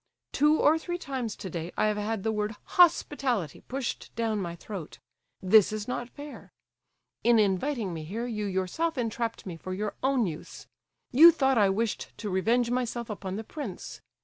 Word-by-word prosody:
Two 300 +2 +3
or 315 +2 +4
three 350 +2 -4
times 260 -9 -4
to - - -7
day 170 -1 -5
I - - +3
have 210 -1 +1
had 210 -1 -2
the 220 - +1
word 210 0 -2
'hospitality' 280 - +2
pushed 260 -1 -4
down 225 -2 0
my 170 -2 -4
throat; 180 -2 -8 0.5
this 200 +2 +6
is 215 -1 -4
not 245 -1 -3
fair. 290 +2 -10 0.7
In 235 0 +5
inviting 210 +1 +1
me 160 -1 -5
here 215 +9 -4
you 210 -4 -3
yourself 195 - -1
entrapped 230 -1 -2
me 175 -4 -6
for 185 +3 -5
your 210 +1 -3
own 265 -3 +2
use; 160 -4 -7 0.5
you 320 +7 +9
thought 270 -6 +2
I 200 -2 +5
wished 215 +3 -2
to 210 -3 -4
revenge 235 +6 +2
myself 240 -2 -2
upon 195 -2 -5
the 220 - -4
prince. 240 - -7
225 Hz, 175 wpm, -28 LUFS, 195-255 Hz, 0.7 s, you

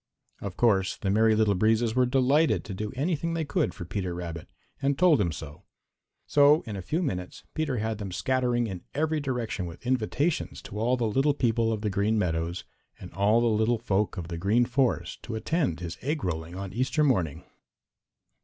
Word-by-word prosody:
Of 100 -3 -6
course 100 -5 +2
the 95 - -1
Merry 110 +1 +4
Little 110 -2 +3
Breezes 110 +3 +2
were 125 0 +3
delighted 135 +5 +3
to 105 - -6
do 105 +2 -4
anything 165 +3 -1
they 160 -1 -1
could 150 +2 0
for 85 - -8
Peter 90 -1 -3
Rabbit, 85 -2 -6 0.3
and 140 0 +1
told 170 -9 +5
him 85 -4 +1
so. 75 +3 -8 0.6
So 145 +2 +5
in 110 - -6
a 95 - -4
few 160 - -1
minutes 90 - -4
Peter 155 -5 -1
had 110 0 -2
them 100 -3 -5
scattering 125 +3 +1
in 95 -5 -5
every 155 +1 +1
direction 120 -9 -3
with 85 +6 -11
invitations 130 +6 0
to 105 - -7
all 120 +3 +2
the 120 - 0
little 135 +6 +2
people 115 -3 +1
of 110 -2 -2
the 105 -2 -1
Green 105 +3 +1
Meadows 85 -2 -1 0.4
and 90 - -10
all 105 +5 +3
the - - +2
little 110 +2 +2
folks 105 -2 -1
of 85 -2 -5
the 85 -1 -4
Green 110 +7 +3
Forest 125 +1 0
to 115 - -6
attend 110 - -1
his 85 -1 -6
egg 150 +3 -2
rolling 85 -1 -3
on 95 0 -6
Easter 130 +7 +1
morning. 95 - +1
110 Hz, 195 wpm, -27 LUFS, 95-130 Hz, 0.6 s, told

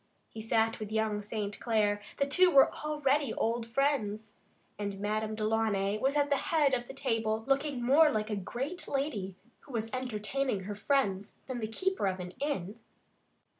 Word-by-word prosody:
He 220 - -8
sat 225 0 +1
with 215 -1 -6
young 220 -1 0
St. 205 -1 -4
Clair 210 -3 +1 0.2
the 280 - +2
two 365 +6 +5
were 275 -5 +6
already 295 -3 0
old 230 0 -1
friends 220 -5 0 0.5
and 200 -1 -3
Madame 215 +1 -1
Delaunay 215 -2 0
was 275 +4 +1
at 290 0 +2
the 280 - +4
head 300 -4 +2
of 245 -1 -1
the - - -8
table, 225 -5 -1
looking 275 -2 0
more 295 +6 +6
like 215 -4 -1
a - - 0
great 250 - -4
lady 240 -10 -2 0.2
who 275 - -14
was 225 0 -3
entertaining 255 -1 -2
her 205 +2 -4
friends 205 -4 0
than 255 -2 -4
the 220 - -2
keeper 375 - -1
of 185 0 -1
an 180 0 -6
inn. 225 -8 -3
225 Hz, 170 wpm, -31 LUFS, 210-275 Hz, 0.5 s, were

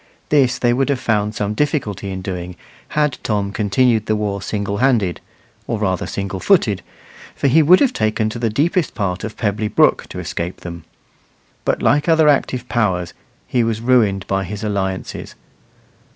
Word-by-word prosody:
This 135 -4 +3
they 120 -1 +2
would 135 +3 +1
have 140 -3 +1
found 105 -3 0
some 105 0 -1
difficulty 105 - -1
in 95 -1 -5
doing, 90 -1 -5 0.4
had 150 -3 +1
Tom 100 -2 -1
continued 110 +2 +1
the 110 - +2
war 100 -2 -2
single 100 -1 -3
handed, 115 -8 +1 0.5
or 115 - -1
rather 95 -4 -1
single 100 -1 -4
footed, 110 - +2 0.5
for - - -4
he 145 +4 +5
would 175 +5 +6
have 265 -3 +3
taken 110 0 0
to 120 - -6
the 115 -1 0
deepest 160 - 0
part 90 -4 -2
of 110 0 -6
Pebbly 105 -1 -1
Brook - - +3
to - - -8
escape 85 +2 -4
them; 85 -2 -8 0.8
but, - - 0
like 145 +3 +3
other 160 -1 +5
active 130 -3 +1
powers, 90 -7 0 0.3
he 125 -2 +1
was 115 -1 -1
ruined 110 -5 +2
by 95 0 -1
his 105 +3 -6
alliances. 95 -3 -3
110 Hz, 170 wpm, -19 LUFS, 100-130 Hz, 0.8 s, would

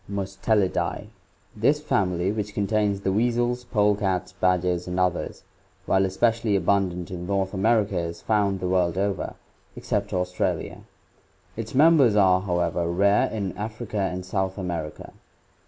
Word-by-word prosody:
Mustellidae. 100 0 -1 0.2
— - - -37 0.2
This 140 +8 +2
family, 95 - 0
which 105 -1 -4
contains 105 -1 0
the 95 - 0
weasels, 120 +2 0
polecats, 105 -5 +1
badgers, 90 -1 0
and 90 +1 -2
others, 90 -1 -1 0.4
while 95 0 +3
especially 110 +2 +1
abundant 95 -2 0
in 90 -1 -6
North 95 0 -1
America 100 -1 +2
is 85 0 -4
found 100 -3 0
the 90 - -1
world 90 -1 +1
over, 100 0 -2 0.4
except - - -2
Australia. 90 0 -2 0.8
Its 115 +2 -6
members 145 -6 +5
are, 95 -3 +4
however, 85 -2 -1
rare 100 +4 +3
in 100 -4 -4
Africa 110 0 -5
and 90 -2 -2
South 95 0 -2
America. 85 -5 -5
95 Hz, 135 wpm, -25 LUFS, 90-105 Hz, 0.8 s, members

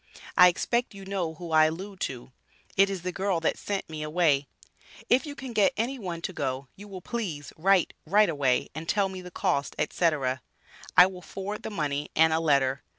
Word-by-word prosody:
I 180 - +9
expect 235 +6 0
you 195 -1 -10
know 185 -5 -2
who 170 0 -8
I 155 0 +6
allude 185 +5 -4
to, 125 -1 -9 0.4
it 195 +1 +5
is 190 -3 -4
the 180 - -2
girl 190 -1 0
that 165 - +1
sent 200 -1 -4
me 155 -1 -6
away. 150 -3 +2 0.6
If 260 +5 +4
you 285 - -6
can 265 -3 -7
get 210 -3 +3
any 250 +4 -1
one 175 -5 -5
to 190 - -3
go, 135 -3 -3
you 205 +2 -11
will 190 -2 -8
please 185 -12 -4
write 190 +2 +3
right 210 +5 +5
away 140 -5 +1
and 160 +2 -7
tell 200 -2 +2
me 190 -1 -7
the 180 - -9
cost, 175 -6 -1
&c. 175 - 0 0.9
I 180 - +11
will 185 -1 -6
forward 195 +4 -6
the - - -5
money 150 -7 -2
and 160 0 +5
a 160 - +2
letter. 140 -4 +2
180 Hz, 205 wpm, -27 LUFS, 155-200 Hz, 0.9 s, I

